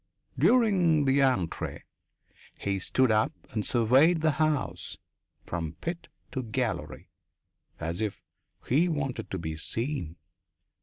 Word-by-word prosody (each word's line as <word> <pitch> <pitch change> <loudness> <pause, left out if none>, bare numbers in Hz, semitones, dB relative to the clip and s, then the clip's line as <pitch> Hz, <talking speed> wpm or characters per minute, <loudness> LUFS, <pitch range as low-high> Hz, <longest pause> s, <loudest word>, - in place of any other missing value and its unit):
During 185 - +4
the 135 +1 +3
entr'acte 125 -12 0 0.7
he 100 -1 -1
stood 130 +6 +2
up 110 0 +3 0.2
and 110 -1 -1
surveyed 130 +10 +4
the 155 0 +3
house 155 -3 -1 0.5
from 80 -3 -3
pit 170 - -5 0.2
to 130 - -2
gallery, 120 0 -3 0.7
as 85 +4 -3
if 105 -2 -2 0.5
he 160 +8 +3
wanted 135 -7 -3
to 95 - -3
be 80 -2 -4
seen. 115 - -2
130 Hz, 115 wpm, -28 LUFS, 100-155 Hz, 0.7 s, During